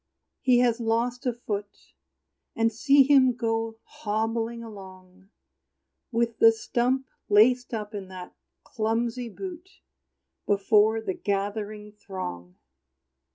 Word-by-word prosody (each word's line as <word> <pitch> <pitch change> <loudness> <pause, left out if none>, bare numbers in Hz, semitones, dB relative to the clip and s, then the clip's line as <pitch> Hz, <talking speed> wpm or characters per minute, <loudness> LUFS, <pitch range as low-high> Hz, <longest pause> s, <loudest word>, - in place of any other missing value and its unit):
he 250 -2 +4
has 240 -1 +2
lost 235 +3 -1
a - - +3
foot; 210 -3 -7 0.6
And 225 0 +2
see 275 +5 +5
him 260 -3 +5
go 225 -1 -2
hobbling 225 +2 -3
along, 190 -3 -13 0.8
With 230 -1 -1
the 225 - +8
stump 245 +4 -1 0.2
laced 245 +5 +4
up 215 -2 -5
in 200 -2 -6
that 185 -1 -10 0.3
clumsy 230 +1 -2
boot, 360 - -8 0.8
Before 210 +2 +3
the 190 - -3
gathering 205 +2 -3
throng! 90 - -7
225 Hz, 110 wpm, -26 LUFS, 205-240 Hz, 0.8 s, the